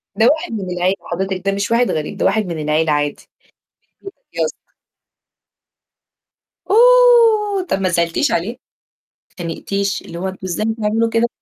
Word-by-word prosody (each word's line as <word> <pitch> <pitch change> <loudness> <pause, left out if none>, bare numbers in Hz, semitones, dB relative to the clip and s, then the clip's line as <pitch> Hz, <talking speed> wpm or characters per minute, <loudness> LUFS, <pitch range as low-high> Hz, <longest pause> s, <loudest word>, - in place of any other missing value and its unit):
ده 225 +1 +4
واحد 310 -4 -3
من 195 -4 -4
العيلة 185 +2 +1 0.2
حضرتِك، 190 +1 -3
ده 195 - +2
مش 200 +3 -2
واحد 240 +1 +2
غريب، 155 -1 -4
ده - - -1
واحد 210 +1 +2
من 170 -3 -5
العيلة 155 +1 +1
عادي، 145 0 -2 0.7
البيت 390 0 -9
بيتك - - -49
يا - - +2
أسطى. - - -8 2.1
أوه! 460 -4 +5
طَب 195 - 0
ما 185 - +1
زعلتيش 170 - 0
عليه؟ 175 +6 0
ما 240 - -6 0.8
أتخانقتيش، 195 +3 -3
اللي 170 0 -9
هو 190 - -3
أنتم 190 - -7
إزاي 185 +4 -2
بتعملوا 225 +1 0
كده 230 +1 +1
200 Hz, 165 wpm, -18 LUFS, 175-245 Hz, 2.1 s, أوه